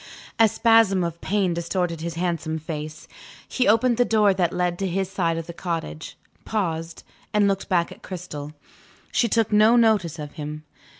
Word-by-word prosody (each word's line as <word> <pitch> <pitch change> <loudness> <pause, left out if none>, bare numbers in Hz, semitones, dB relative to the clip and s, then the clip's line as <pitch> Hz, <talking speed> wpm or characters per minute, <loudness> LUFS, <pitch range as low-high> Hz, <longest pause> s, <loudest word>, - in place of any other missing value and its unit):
A 225 - +7
spasm 220 -4 +4
of 170 -1 -4
pain 195 -3 0
distorted 170 -1 -2
his 170 0 -4
handsome 165 -2 -2
face. 155 -1 -7 0.4
He 255 - 0
opened 230 +3 +3
the 245 - +5
door 215 -4 +3
that 180 -3 0
led 180 -1 -1
to 195 - -1
his 190 +1 -2
side 170 -4 0
of 165 - -4
the 170 - -8
cottage 165 - -5 0.3
paused 165 -6 -3 0.3
and 205 -1 +4
looked 195 -1 -1
back 175 -3 +1
at - - -12
Cristel. 155 -5 -7 0.6
She 235 - +2
took 225 -1 +1
no 215 +3 +5
notice 215 -9 +3
of 150 -2 -7
him. 150 -1 -7
180 Hz, 175 wpm, -24 LUFS, 165-210 Hz, 0.6 s, A